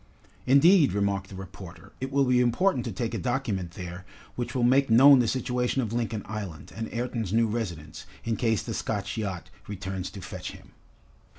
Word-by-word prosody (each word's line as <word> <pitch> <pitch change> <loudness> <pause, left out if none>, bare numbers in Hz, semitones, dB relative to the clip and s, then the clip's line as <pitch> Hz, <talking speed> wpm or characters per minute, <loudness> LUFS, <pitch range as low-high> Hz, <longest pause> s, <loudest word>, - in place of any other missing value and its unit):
"Indeed," 145 - +6
remarked 100 -1 -1
the 100 - -9
reporter, 95 0 -10
"it 135 +1 -3
will 140 0 +3
be 125 -1 +3
important 125 +2 +2
to - - -3
take 120 -3 -3
a - - -2
document 110 -9 -2
there 90 -2 -7 0.3
which 120 0 -4
will 125 - +1
make 135 +2 +4
known 135 +4 +8
the 120 - +2
situation 125 +1 0
of 110 -1 -4
Lincoln 115 -3 -2
Island, 100 -7 -7
and 115 0 -5
Ayrton's 115 -4 -3
new 115 +2 +3
residence, 90 -9 -5 0.2
in 115 -1 -1
case 110 -3 0
the 115 - -4
Scotch 100 -2 -3
yacht 100 -6 -4 0.2
returns 95 -2 -5
to 100 - -10
fetch 90 -1 -7
him." - - -15
115 Hz, 185 wpm, -27 LUFS, 95-125 Hz, 0.3 s, known